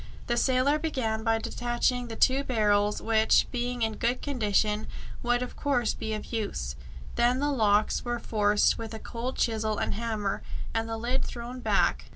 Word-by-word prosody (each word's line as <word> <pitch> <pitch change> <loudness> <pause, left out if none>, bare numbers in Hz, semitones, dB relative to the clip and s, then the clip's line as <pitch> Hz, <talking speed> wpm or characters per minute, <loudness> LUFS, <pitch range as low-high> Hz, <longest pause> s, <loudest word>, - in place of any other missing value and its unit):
The 240 - 0
sailor 260 +4 +3
began 235 -9 -1
by 225 -1 +2
detaching 240 +2 -1
the 225 - -6
two 265 +4 +3
barrels, 210 -5 +2
which, 220 -1 +4
being 245 -1 -2
in 220 -1 -1
good 240 +2 0
condition, 215 -5 +1 0.3
would 245 +1 +1
of 250 - -7
course 250 -6 +1
be 220 0 -3
of 215 - -8
use. 65 - -2 0.4
Then 245 +1 +3
the 290 +2 +1
locks 215 -5 +2
were 240 -1 -2
forced 210 -2 +2
with 225 -1 -5
a - - -6
cold 240 +3 -5
chisel 220 -2 0
and - - -1
hammer, 215 -3 -2 0.3
and 225 0 -1
the 225 - -2
lid 245 +4 -1
thrown 245 +1 -6
back. - - +1
230 Hz, 175 wpm, -28 LUFS, 220-250 Hz, 0.4 s, which